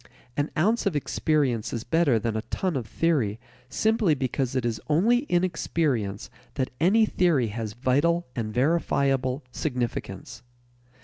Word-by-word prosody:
An 145 +1 0
ounce 215 +7 +2
of 185 - -1
experience 140 -5 0
is 115 - -3
better 160 -7 +2
than 110 0 -2
a 110 - -1
ton 185 -4 -1
of 120 -5 -3
theory 130 -12 0 0.3
simply 220 - +2
because 130 -1 -2
it 130 -2 0
is 115 -2 -2
only 190 +11 +4
in 175 0 +3
experience 130 - -1 0.2
that 130 -2 -1
any 210 +7 +4
theory 165 - +2
has 110 0 -4
vital 145 +8 +1
and 110 -3 -3
verifiable 135 -1 +1
significance. 120 - -4
140 Hz, 140 wpm, -26 LUFS, 120-170 Hz, 0.3 s, only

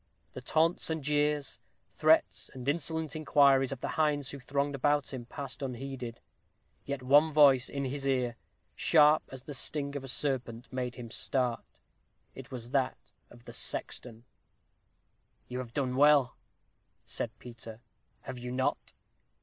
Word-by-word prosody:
The 130 - -7
taunts 160 +7 +1
and 160 -2 -2
jeers, 150 0 0 0.3
threats - - +2
and 130 0 -8
insolent 160 0 -1
inquiries, 140 -3 +4
of 135 - -5
the - - -2
hinds 145 -3 +1
who 140 - -7
thronged 140 +2 -1
around 145 -1 +2
him, 130 -3 -6
passed 140 +1 -6
unheeded; 130 -2 -5 0.7
yet 140 -2 -4
one 145 +5 +5
voice 140 -4 +6
in 140 -1 -3
his 140 +1 -3
ear, 125 -3 +1 0.4
sharp 155 -1 +5
as 130 -1 -8
the 145 - -7
sting 140 +1 -2
of 140 - -4
a - - -7
serpent, 130 -3 -2
made 125 -1 -3
him 120 -3 -8
start. 125 -2 -1 0.5
It - - -10
was 120 -2 -7
that 135 -2 +1 0.3
of - - -16
the - - -10
sexton. 120 -1 -4 1.2
"You 125 0 -5
have 125 -2 -6
done 130 -1 -1
well," 145 -2 +5 0.7
said - - -2
Peter, 115 -2 -10 0.4
"have 130 -2 -7
you 125 0 -6
not? 130 +1 -1
135 Hz, 150 wpm, -30 LUFS, 125-145 Hz, 1.2 s, voice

